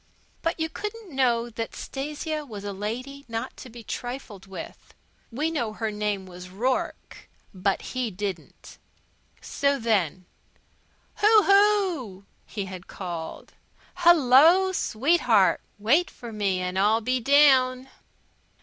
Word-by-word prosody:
But 330 +1 -2
you 320 - 0
couldn't 420 -1 -7
know 240 -3 +2
that 225 0 -5
Stasia 300 +2 -4
was 215 -8 -9
a 205 -1 -4
lady 250 +8 -5
not 225 -1 -5
to 255 - -10
be 235 0 -11
trifled 240 -6 -7
with. 195 - -10 0.4
We 300 +7 -1
know 235 -9 -2
her 220 0 -3
name 210 -2 -2
was 180 0 -11
Rourke, 245 +8 -3 0.2
but 195 +1 -1
he 255 -2 -1
didn't. 190 -3 -7 0.6
So 280 0 0
then: 190 - 0 0.9
"Hoo 425 0 +5
Hoo!" 385 - +2 0.2
he 200 -3 -4
had 185 -1 -9
called. 170 -4 -7 0.4
"Hello, 340 +2 +6
sweetheart! 245 - +2 0.2
Wait 270 +13 +2
for 235 -2 -10
me 195 -3 0
and 180 +1 -2
I'll 215 +3 +3
be 255 +3 0
down." 260 -1 +4
240 Hz, 125 wpm, -25 LUFS, 205-295 Hz, 0.9 s, Hello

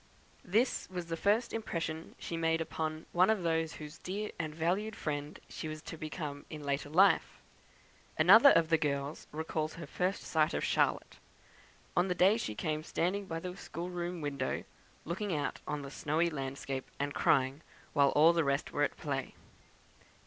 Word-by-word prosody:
This 220 +5 +1
was 180 -2 -4
the 165 - -1
first 210 +7 +1
impression 165 -7 -4
she 170 - -5
made 165 0 +1
upon 155 -1 -3
one 180 +3 +4
of 215 -4 +2
those 160 -1 0
whose 150 +2 -9
dear 205 +3 -4
and 155 -2 -3
valued 190 +7 0
friend 145 -1 -4
she - - -6
was 155 0 -5
to - - -7
become 155 -2 -5
in 150 -2 -7
after 140 +1 -1
life. 185 +3 +4 0.8
Another 205 - +9
of 165 -9 +4
the 165 -1 +4
girls 140 -1 -2
recalls 155 0 -3
her 165 - -7
first 180 +6 -1
sight 155 -1 +1
of - - -1
Charlotte, - - +1 0.8
on 175 +2 +3
the 180 - 0
day 190 +4 +5
she 110 - -3
came, 155 +6 -1
standing 185 +5 -1
by 165 -2 -3
the 180 +1 -6
schoolroom 175 -1 -5
window, 140 -3 -2 0.4
looking 185 +2 -2
out 145 - -2
on 150 -1 -3
the 140 - -7
snowy 160 +4 0
landscape, 135 -2 -4
and 145 0 -1
crying, 135 +3 +2 0.3
while 140 -2 +5
all 160 +3 +7
the 170 -1 +2
rest 140 0 0
were 145 - -1
at 145 - +1
play. 135 -3 -3
160 Hz, 170 wpm, -32 LUFS, 150-180 Hz, 0.8 s, Another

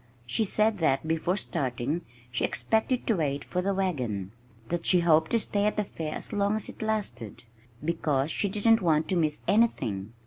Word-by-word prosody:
She 220 - 0
said 215 +1 +2
that 155 -1 +1
before 165 +4 0
starting 135 - -2 0.3
she 120 - -1
expected 220 - 0
to 225 - +2
wait 145 -3 -1
for 180 - -2
the 195 +1 0
wagon, 125 - -2 0.4
that 175 -1 -1
she 180 -2 +4
hoped 160 -2 +4
to 235 - +3
stay 205 -2 0
at 210 - -1
the 210 - +2
fair 160 -5 -5
as - - -6
long 205 0 +1
as 215 - -2
it - - -10
lasted 195 - -3 0.4
(because 155 -3 0
she 205 - 0
didn't 225 +3 +3
want 160 -3 +2
to 190 - +1
miss 155 -3 0
anything!) 115 - +1
170 Hz, 185 wpm, -28 LUFS, 140-205 Hz, 0.4 s, she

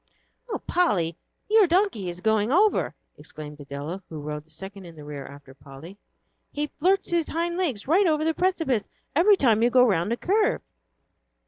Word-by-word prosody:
"Oh, 430 - -2
Polly, 185 - +1 0.3
your 430 -2 +5
donkey 345 - +1
is 175 +1 -7
going 220 +2 +1
over," 405 +7 +2 0.2
exclaimed 150 -1 -9
Adela, 145 +6 -6
who 160 - -7
rode 150 0 -6
the - - -31
second 190 +4 -9
in 165 - -12
the 150 - -11
rear 145 -2 -7
after 140 -1 -13
Polly; 140 +6 -12 0.6
"he 295 +1 -2
flirts 380 +5 +2
his 335 -2 +1
hind 340 +1 -1
legs 285 - -2
right 365 +6 +4
over 310 -1 +1
the 320 - +2
precipice 325 - 0 0.3
every 385 +7 +6
time 225 - +3
you 240 - +4
go 250 +1 +5
round 195 -2 +1
a 235 - 0
curve." 415 - +1
220 Hz, 180 wpm, -25 LUFS, -, 0.6 s, every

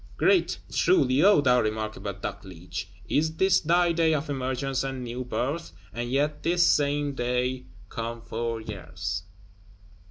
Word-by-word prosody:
Great, 380 -1 +3
truly, 245 - +3
O 200 -4 +6
thou 125 -3 +4
remarkable 110 -1 -3
Dogleech, 90 -2 -6 0.2
is 160 +1 +1
this 190 +2 +4
thy 175 +2 +3
day 165 -1 +3
of 150 0 -3
emergence 130 0 -1
and 135 -1 -4
new 120 +1 -4
birth; 140 +6 -3 0.2
and 120 +2 -3
yet 145 +3 0
this 175 +1 +3
same 145 0 +2
day 125 0 -1 0.2
come 115 +2 -5
four 115 0 -3
years! 95 -3 -5
130 Hz, 135 wpm, -27 LUFS, 115-155 Hz, 0.2 s, O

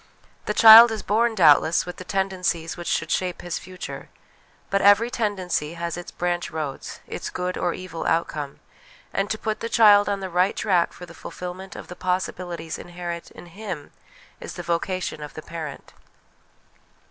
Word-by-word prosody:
The 210 - -2
child 225 +1 +11
is 220 -2 -4
born, 225 +2 +1
doubtless, 160 -2 +5
with 180 - -7
the - - -8
tendencies 180 -3 -1
which 175 -1 -8
should 165 - -1
shape 180 -2 -1
his 175 -1 -3
future; 185 0 -8 0.6
but 195 0 +2
every 205 +4 +5
tendency 185 -8 -2
has 170 0 -3
its 175 0 -7
branch 175 0 -2
roads, 155 -4 -6
its - - -6
good 180 0 -3
or 175 - -1
evil 185 -3 -6
out 165 +1 +2
come; 145 -2 -7 0.5
and 195 +1 -1
to 220 - -1
put 215 0 -3
the 230 - -4
child 205 -3 +6
on 200 -1 -1
the 190 - -4
right 180 +2 +1
track 180 -6 +1
for 180 - -11
the 170 - -13
fulfilment 180 +2 -8
of - - -9
the 180 - -9
possibilities 180 -3 -3
inherent 175 -1 -6
in - - -13
him, 175 -4 -7 0.5
is - - -8
the - - -6
vocation 170 -1 -2
of 150 - -8
the 155 - -8
parent. 160 -3 -8
180 Hz, 175 wpm, -24 LUFS, 170-200 Hz, 0.6 s, child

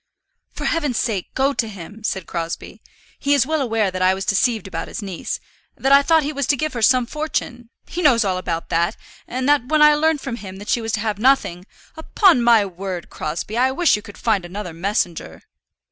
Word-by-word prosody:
"For - - -6
heaven's 295 -8 0
sake 210 -7 -2
go 270 +2 +2
to 230 - -1
him," 205 +1 -10
said 190 -4 -2
Crosbie. 170 -1 -5 0.4
"He 285 0 +2
is 265 -4 +3
well 310 +1 0
aware 225 -6 0
that 185 0 -4
I 185 +1 +4
was 190 0 -5
deceived 220 +2 +1
about 165 -3 -5
his - - -6
niece, 190 -4 -4 0.4
that 270 - 0
I 280 0 +8
thought 320 +2 +3
he 295 +2 -3
was 280 -2 -2
to 285 - +2
give 310 +1 -2
her 235 - -4
some 250 +2 +4
fortune. 245 -4 -4 0.2
He 355 - -5
knows 245 -9 +4
all 185 -2 0
about 170 -2 -4
that, 170 +1 0 0.3
and 255 +1 -3
that 290 -4 +3
when 305 +1 +4
I 300 0 +8
learned 315 +1 +2
from 250 -4 -5
him 190 -4 -9
that 205 +1 -9
she 240 - +2
was 225 -1 -4
to 210 - 0
have 210 -2 -2
nothing 215 -8 +2
" - - -27
"Upon 330 - +3
my 235 -3 +5
word, 185 -1 -6
Crosbie, 170 +9 -4
I 260 +1 +4
wish 325 +6 +3
you 210 - -5
could 205 - -12
find 215 -5 +1
another 180 0 -6
messenger." 175 -1 -3
225 Hz, 220 wpm, -21 LUFS, 190-275 Hz, 0.4 s, I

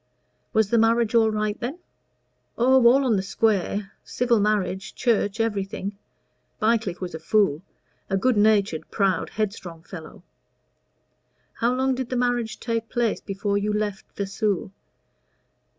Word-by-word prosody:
"Was 220 -2 +2
the 235 - +4
marriage 230 0 +3
all 225 -1 +5
right 215 0 -2
then?" 255 +7 -4 0.8
"Oh, 255 0 +5
all 270 +3 +5
on 230 -5 +3
the - - 0
square 200 -1 0
civil 240 -2 +1
marriage, 200 -2 -1
church 220 -3 +1
everything. 200 -2 -2 0.6
Bycliffe 215 -5 +1
was 180 -3 -5
a 160 - -5
fool 195 -8 +2 0.5
a 195 - +1
good 250 +5 +2
natured, 205 -6 +2
proud, 195 -5 0
headstrong 190 -6 -4
fellow." 165 -1 -10 1.3
"How 240 +1 0
long 265 +1 +1
did 255 -1 -4
the 255 - -1
marriage 240 -2 0
take 230 -1 -3
place 240 -3 0
before 200 0 -1
you 210 +1 -1
left 210 -2 -2
Vesoul?" 200 -1 -2
215 Hz, 135 wpm, -24 LUFS, 195-235 Hz, 1.3 s, all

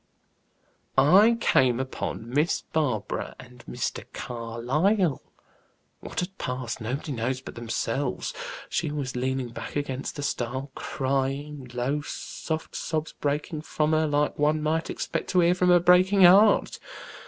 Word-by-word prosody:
"I 195 +12 +6
came 130 - +3
upon 130 -3 -4
Miss 145 +7 +1
Barbara 130 -10 -1
and 125 -1 -14
Mr. - - -3
Carlyle. 130 - 0 0.8
What - - -4
had 185 +2 -5
passed, 125 -2 -4
nobody 130 +7 -3
knows 130 +1 -1
but 130 - -9
themselves. 120 +3 -2 0.3
She 160 -4 -1
was 140 -4 -4
leaning 130 0 -1
back 130 +5 -8
against 135 -2 -3
the 145 - -5
stile, 130 +1 -3
crying; 135 +1 -2
low, 135 +5 0
soft 160 +2 -5
sobs 155 -1 -3
breaking 150 +2 -2
from 155 0 0
her, 155 0 +2
like 145 0 0
one 150 +1 +2
might 160 +1 0
expect - - -3
to 180 - +3
hear 170 +1 +4
from 180 0 +2
a 175 0 +7
breaking 185 +3 +5
heart. 200 +4 +6
145 Hz, 135 wpm, -26 LUFS, 125-160 Hz, 0.8 s, a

